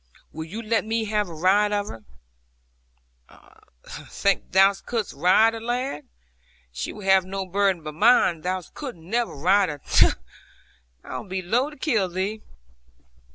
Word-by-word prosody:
Will 160 0 -6
you 210 +8 -7
let 225 +1 +1
me 225 0 -1
have 210 -2 -1
a - - -8
ride 195 +5 +3
of 205 0 -1
her?' 110 -1 -10 2.0
'Think 200 0 -1
thou 195 +1 +5
couldst 220 +2 -4
ride 215 +5 +4
her, 225 - -6
lad? 240 - -3 0.7
She 60 - -5
will 210 - -10
have 190 -1 +5
no 190 +1 -5
burden 190 -2 0
but 155 0 -6
mine. 180 -3 +4
Thou 185 +1 -2
couldst 260 - -7
never 225 +7 -2
ride 185 +6 +3
her. 145 -1 -6
Tut! - - +5 0.9
I - - -6
would 205 - -11
be 190 0 -3
loath 245 +11 0
to - - -15
kill 225 - 0
thee.' 195 +5 -3
200 Hz, 155 wpm, -24 LUFS, 180-225 Hz, 2.0 s, thou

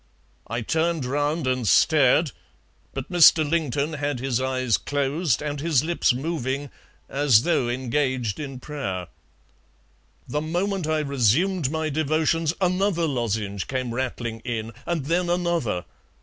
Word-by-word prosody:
I 115 +2 -3
turned 160 +3 0
round 145 +3 -1
and 130 -3 0
stared, 145 - +4 0.6
but 135 +5 -6
Mr. 165 -3 +6
Lington 150 -1 0
had 145 -3 -2
his 130 -1 -1
eyes 130 -3 +1
closed 145 0 -1
and 145 -1 -3
his 155 -5 +2
lips 170 +2 +2
moving 135 0 -3 0.4
as 135 -5 +4
though 135 -8 +1
engaged 130 -2 -1
in 135 -4 -6
prayer. 95 - -5 1.2
The 150 - -2
moment 175 +2 -1
I 155 -1 +1
resumed 140 - +2
my 160 0 -2
devotions 155 +2 +1
another 185 -1 +1
lozenge 110 -8 -2
came 130 -3 -3
rattling 120 -2 -3
in, 115 -1 -4 0.2
and 165 -5 -1
then 175 +3 0
another. 170 - 0
145 Hz, 130 wpm, -24 LUFS, 125-160 Hz, 1.2 s, Mr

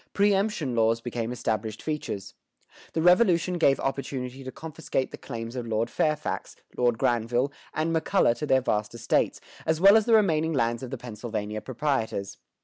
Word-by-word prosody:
Preëmption 200 - +2
laws 115 0 +3
became 120 -1 -4
established 110 -3 -3
features. 150 -10 -4 0.6
The 160 - 0
Revolution 180 -1 +4
gave 140 -4 +4
opportunity 135 -1 -3
to 130 - -6
confiscate 150 -4 -3
the - - -7
claims 115 -1 -6
of 120 -2 -4
Lord 115 +1 -1
Fairfax, 155 -1 -1 0.2
Lord 120 -2 +2
Granville, 120 +4 +1 0.2
and 165 +1 0
McCulloh 160 -6 +3
to 150 - -3
their 130 -1 +4
vast 105 -2 -1
estates, 115 -1 +1 0.2
as 160 0 0
well 200 +3 +8
as 220 0 +4
the 230 - +6
remaining 165 -6 +3
lands 115 -4 0
of 130 - -6
the 135 - -4
Pennsylvania 110 -2 -5
proprietors. 115 -5 -2
130 Hz, 160 wpm, -27 LUFS, 115-160 Hz, 0.6 s, well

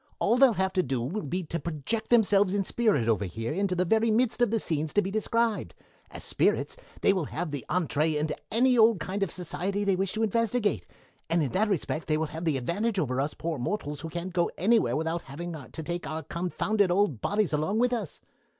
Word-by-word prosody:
"All - - +2
they'll 260 -1 +6
have 190 +1 0
to 185 - +3
do 130 -5 -2
will 155 - -3
be 180 +6 -2
to 170 +1 -3
project 170 +8 -3
themselves 205 -4 +4
in 200 - +1
spirit 200 - +1
over 105 -3 +2
here 115 - -4
into 195 +1 0
the 180 +1 +1
very 225 +5 +2
midst 235 +2 +2
of 240 - +4
the 225 - +1
scenes 155 -6 -1
to 205 - +5
be 190 - -3
described. 225 +1 0 0.3
As - - -8
spirits 455 - +1 0.3
they - - +4
will 185 -5 -1
have 165 +2 -4
the 140 -4 -4
entrée 155 -2 +1
into 155 +1 -1 0.2
any 250 +1 +4
old 220 -3 +5
kind 190 +5 -4
of 195 - +1
society 180 +4 -2
they 200 -2 +2
wish 190 0 -1
to 220 +1 -1
investigate, 225 0 0 0.4
and 165 -1 +2
in 135 - -2
that 210 +3 +1
respect 165 -4 -2
they 155 -1 +2
will 160 - 0
have 160 +2 -5
the 155 -4 +2
advantage 200 - -1
over 130 -6 0
us 145 +2 -3
poor 165 -4 -3
mortals 150 -1 -3
who 165 - -5
can't 175 +2 -5
go 175 -1 +2
anywhere 220 +5 +3
without 160 +2 -1
having 170 +6 -7 0.2
to 160 - -6
take 175 +2 -4
our 160 0 -4
confounded 180 +5 0
old 180 - +1
bodies 205 -5 0
along 155 +8 0
with 250 +1 +2
us. 210 -10 -4
180 Hz, 225 wpm, -28 LUFS, 155-215 Hz, 0.4 s, they'll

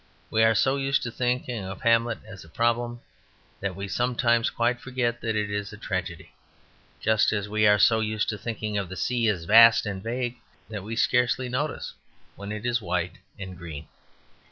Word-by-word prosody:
We 110 - +2
are 110 0 +5
so 135 +6 +2
used 135 0 0
to 120 - -3
thinking 125 -2 -2
of 95 0 -7
"Hamlet" 115 -1 +2
as 105 -3 -11
a 80 - -16
problem 120 +4 0 0.6
that 95 -1 -3
we 100 +1 -5
sometimes 120 0 +1
quite 120 +1 0
forget 120 -2 -2
that 115 -1 -1
it 105 -1 -1
is 105 -1 -3
a 105 - -10
tragedy, 95 -5 -5 0.7
just 110 -1 +3
as 105 -2 -2
we 105 0 +2
are 105 0 +6
so 110 +3 +5
used 110 -1 -1
to 105 - -3
thinking 110 -1 -3
of 95 -3 -4
the 95 - -7
sea 120 -2 0
as 95 -6 0
vast 115 +5 +7
and 100 -2 -4
vague, 120 +2 -3 0.3
that 105 -2 -5
we 110 +4 -5
scarcely 125 +1 +2
notice 145 +5 -3 0.4
when 100 +1 -7
it 105 +2 -5
is 120 -1 +1
white 90 -2 -2 0.2
and 95 -2 -7
green. 80 -4 -8
110 Hz, 190 wpm, -26 LUFS, 100-120 Hz, 0.7 s, vast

